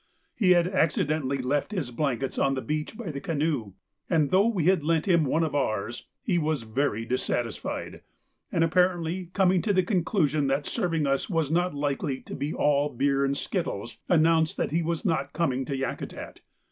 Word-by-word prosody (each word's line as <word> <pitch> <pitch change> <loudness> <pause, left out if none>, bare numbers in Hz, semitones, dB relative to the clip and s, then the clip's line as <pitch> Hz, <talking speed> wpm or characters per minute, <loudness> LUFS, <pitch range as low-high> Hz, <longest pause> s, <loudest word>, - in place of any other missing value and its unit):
He 185 -5 +4
had 175 0 +3
accidentally 155 -5 +1
left 135 +7 -1
his 155 -11 -2
blankets 135 0 -1
on 135 0 +2
the 130 - -2
beach 155 +7 -3
by 215 -9 -5
the 140 -1 -6
canoe, 145 - -1 0.4
and 155 -5 +2
though 195 +4 +5
we 205 -8 0
had 185 -3 +3
lent 160 +2 +1
him 170 -4 +4
one 160 +5 +1
of 155 -3 -2
ours, 120 -4 -2 0.2
he 180 -5 +1
was 155 -5 -1
very 115 -1 -1
dissatisfied, 120 -1 -3 0.5
and 165 - +2
apparently 175 0 +1
coming 185 -2 +3
to 210 - +1
the 185 -1 +3
conclusion 165 -6 +1
that 135 +2 0
serving 165 -9 0
us 135 +6 0
was 165 -5 0
not 175 -1 +1
likely 140 -1 -1
to - - -10
be 145 +2 -3
all 145 -1 +2
beer 140 +2 +1
and 140 0 0
skittles, 120 - -3
announced 160 -2 +3
that - - -1
he 165 +2 +1
was 165 +2 -2
not 160 -7 0
coming 135 -6 0
to 140 - -3
Yakutat. 135 -1 -5
155 Hz, 185 wpm, -27 LUFS, 135-175 Hz, 0.5 s, though